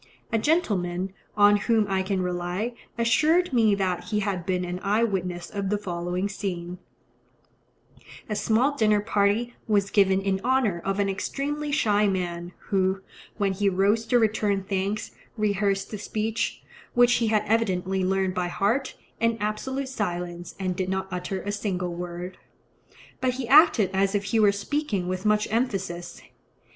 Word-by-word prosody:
A 225 - +3
gentleman, 195 - 0 0.2
on 205 0 +6
whom 220 +1 +2
I 190 -1 +1
can 190 -1 -1
rely, 180 +6 -2 0.2
assured 305 +9 +3
me 220 -4 +4
that 185 -3 -1
he 210 -1 -1
had 195 -3 -2
been 180 -1 0
an 180 +1 -4
eye 210 +3 +2
witness 180 -5 -2
of 200 -2 -2
the 210 - +1
following 180 -1 -2
scene:—A 185 +2 -10
small 235 +7 +2
dinner 215 -5 +3
party 210 +3 +1
was 200 -2 +2
given 190 -2 +4
in 195 -1 -1
honour 245 -9 +1
of 195 0 -1
an 200 - +2
extremely 290 +9 -3
shy 210 -8 +3
man, 175 -2 -2 0.2
who, 190 -1 +1 0.4
when 200 -2 +1
he 200 +1 +1
rose 200 +4 +2
to 245 - +4
return 210 -3 +1
thanks, 195 +2 -2 0.3
rehearsed 200 -2 0
the 210 - -5
speech, 220 +2 -2 0.3
which 245 0 +6
he 230 - +2
had 215 -1 +2
evidently 190 -4 +1
learnt 190 0 +1
by 180 -1 -1
heart, 215 +10 0 0.2
in 230 0 +2
absolute 260 +6 -2
silence, 175 -7 -4
and 185 -2 -1
did 185 0 -2
not 190 0 -2
utter 180 +1 -4
a 205 - -2
single 185 -4 -2
word; 175 +1 -6 0.8
but 255 -1 0
he 255 -2 -4
acted 265 - +6
as 195 +1 +1
if 205 - 0
he 200 +3 0
were 210 -2 +6
speaking 200 -2 -2
with 185 +3 -2
much 210 0 +2
emphasis. 195 -7 -2
200 Hz, 155 wpm, -26 LUFS, 185-220 Hz, 0.8 s, on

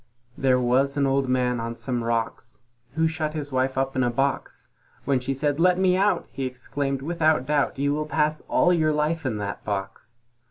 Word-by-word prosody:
There 130 -1 +2
was 130 +3 +1
an 140 - +3
Old 135 -1 +1
Man 125 -1 +1
on 115 0 -4
some 120 -1 -3
rocks, 115 +1 -3 0.3
Who 160 +1 +2
shut 155 -1 -3
his 145 -2 -3
Wife 130 0 0
up 135 0 0
in 130 - +1
a 120 - +2
box: 135 +3 -2 0.4
When 135 -2 +2
she 125 +2 -3
said, 145 +2 -1
"Let 180 +1 +4
me 185 -1 +3
out," 200 +2 +2
he 135 - -4
exclaimed, 135 +2 -3
"Without 155 -4 +1
doubt 145 -1 0
You 140 +1 +1
will 155 +1 -2
pass 155 0 0
all 180 - +4
your 155 -3 +2
life 150 0 0
in 110 -4 -2
that 100 -1 -5
box." 105 +3 -5
135 Hz, 200 wpm, -25 LUFS, 125-155 Hz, 0.4 s, Let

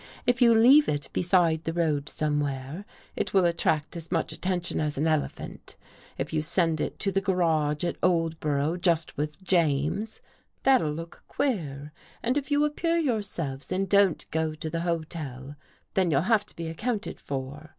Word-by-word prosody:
If 245 0 +2
you 235 -2 +7
leave 260 +6 +7
it 145 -1 -2
beside 175 -3 +2
the 165 - -2
road 150 -4 0
somewhere, 145 +3 -2 0.3
it - - -2
will 190 -2 +5
attract 165 -3 0
as 165 -1 -8
much 165 -3 0
attention 180 -1 -2
as 150 -2 -2
an 150 - +1
elephant. 155 -2 -2 0.4
If - - -4
you 155 - +1
send 165 0 +1
it - - -3
to 200 - 0
the 195 +1 +1
garage 165 -6 +1
at 175 - -2
Oldbor 165 -4 +1
ough 160 +5 -1
just 165 -3 +1
with 150 +5 -4
James, 170 +4 +1 0.4
that'll 260 - +4
look 165 +2 -8
queer, 150 - -2 0.3
and 245 +3 +1
if 285 -1 -2
you 290 0 +3
appear 330 +3 0
yourselves 200 - -2
and 190 +1 0
don't 200 -3 +3
go 160 0 -1
to 155 0 -5
the 165 - -2
hotel, 155 -5 -4 0.4
then 185 -2 +2
you'll 145 -3 +3
have 210 +2 +2
to - - -12
be 165 -1 -5
accounted 215 +6 -3
for. 140 +3 -6
165 Hz, 170 wpm, -27 LUFS, 150-195 Hz, 0.4 s, you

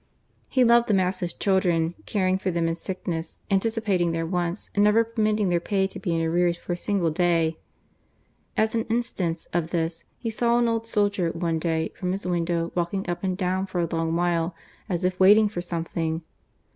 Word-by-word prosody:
He 255 - +3
loved 235 0 +5
them 205 -4 +3
as 185 0 +1
his 175 -1 -2
children, 175 -3 +1
caring 190 -2 +1
for 190 - -1
them 170 -2 0
in 165 - 0
sickness, 170 -2 -5
anti 195 +3 +3
cipating 195 -7 0
their 165 0 -1
wants, 175 +2 -2
and 205 - +3
never 210 +2 +5
permitting 215 -3 0
their 175 -1 +2
pay 195 +2 0
to 190 - -6
be 180 - -2
in 165 - 0
arrears 170 +1 +2
for 175 - -4
a - - -1
single 175 -2 0
day. 165 -1 +1 1.0
As 220 0 +2
an 225 -1 0
instance 205 -8 -2
of 170 -1 0
this, 165 -1 -2
he 230 - -3
saw 235 +1 +2
an 240 0 +3
old 225 0 -1
soldier, 205 -5 +1
one 165 -1 -1
day, 160 -1 0
from 180 0 -2
his 195 0 -4
window, 170 -1 0
walking 180 +3 -2
up 175 +1 -3
and 185 -1 -1
down 190 0 -1
for 190 -2 -3
a 170 -2 0
long 165 0 0
while, 170 0 0 0.3
as 180 -1 -1
if 185 0 0
waiting 210 +3 +7
for 205 -4 -4
something. 165 -1 -3
180 Hz, 200 wpm, -25 LUFS, 170-205 Hz, 1.0 s, waiting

